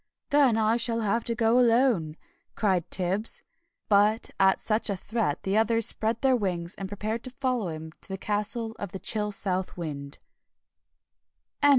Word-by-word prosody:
"Then 280 -6 +4
I 220 +1 +2
shall 230 -1 0
have 220 +2 0
to 235 - -1
go 230 +2 +3
alone," 230 -10 +2 0.4
cried 190 -6 0
Tibbs. 190 +4 0 0.4
But 210 +2 +3
at 190 0 +4
such 215 0 0
a 200 - 0
threat 205 -5 -2
the 195 +1 0
others 225 +1 +3
spread 220 +1 0
their 265 -1 +4
wings, 180 -6 -2
and 195 - -6
prepared 215 +3 -4
to - - -4
follow 255 -5 -2
him 160 -1 -6
to - - -9
the 190 - -4
Castle 210 +3 -2
of 200 -3 -6
the 190 - -5
Chill 210 0 0
South 190 -2 -2
Wind. 145 -4 -5
210 Hz, 165 wpm, -27 LUFS, 190-230 Hz, 0.4 s, Then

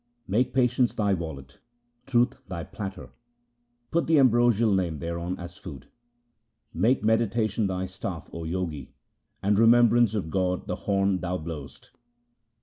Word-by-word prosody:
Make 120 +6 +1
patience 125 -1 +2
thy 100 -2 +1
wallet, 70 -6 -6 0.5
truth 125 0 +2
thy 85 -4 -5
platter, 100 +1 -7 0.8
put 170 - +1
the 160 -1 +4
ambrosial 120 -4 +4
Name 90 -5 0
thereon 85 +3 -4
as 85 0 -9
food. 70 -8 -10 0.8
Make 110 +10 +2
meditation 110 -1 +1
thy 95 0 -2
staff, 90 -2 -6
O 85 - -5
Jogi, 80 -6 -4 0.5
and 100 +1 +2
remembrance 120 -1 +5
of 90 -7 -3
God 90 -1 0
the - - -3
horn 100 -1 0
thou 90 +1 -2
blowest. 80 -4 -9
95 Hz, 135 wpm, -26 LUFS, 85-115 Hz, 0.8 s, remembrance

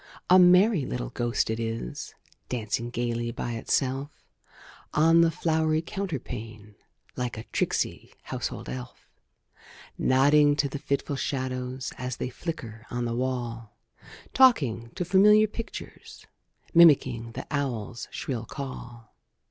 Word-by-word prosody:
A 185 - +9
merry 180 0 +6
little - - -4
ghost 120 -1 0
it 110 - -3
is, 115 - -5 0.3
Dancing 115 0 -2
gayly 120 -1 -2
by 120 0 -4
itself, 135 +4 -1 0.9
On 165 +2 +5
the 170 - +5
flowery 160 -1 0
counterpane, 115 - -6 0.4
Like 125 -2 -3
a 110 - -6
tricksy - - -1
household - - -5
elf; 60 0 -8 0.9
Nodding 145 +3 +4
to 145 -1 +1
the 140 +1 -6
fitful 140 0 -2
shadows, 130 -1 -3
As 125 0 -4
they - - -3
flicker 120 -7 -7
on 120 0 -2
the 115 - -2
wall; 120 -3 -3 0.6
Talking 140 - +4
to 180 -2 -2
familiar 210 +4 +6
pictures, 220 +2 -8 0.5
Mimicking 130 -9 +5
the - - -6
owl's 120 -6 -3
shrill 120 -4 -4
call. 120 -4 -8
130 Hz, 120 wpm, -27 LUFS, 115-155 Hz, 0.9 s, A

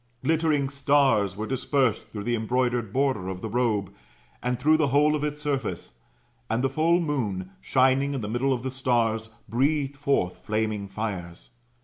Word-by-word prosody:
Glittering 155 -3 +2
stars 135 -8 +2
were 110 - -3
dispersed 130 -1 0
through 105 -2 -6
the 120 - -1
embroidered 120 -1 0
border 130 -8 0
of 95 -1 -5
the 110 - -4
robe, 110 -4 0 0.5
and 125 0 -1
through 155 +4 +4
the 155 -2 +2
whole 150 +3 +3
of 150 - -2
its 150 0 -2
surface: 140 -5 -3 0.6
and 115 +3 0
the 135 - +1
full 165 +4 +3
moon, 110 - -2
shining 135 +2 +2
in 130 - -3
the 105 - -4
middle 120 +5 0
of 125 -2 -1
the 130 - -2
stars, 115 -4 0 0.2
breathed 140 +5 +1
forth 135 -10 0
flaming 110 -2 -1
fires. 95 -4 -5
125 Hz, 165 wpm, -26 LUFS, 110-140 Hz, 0.6 s, through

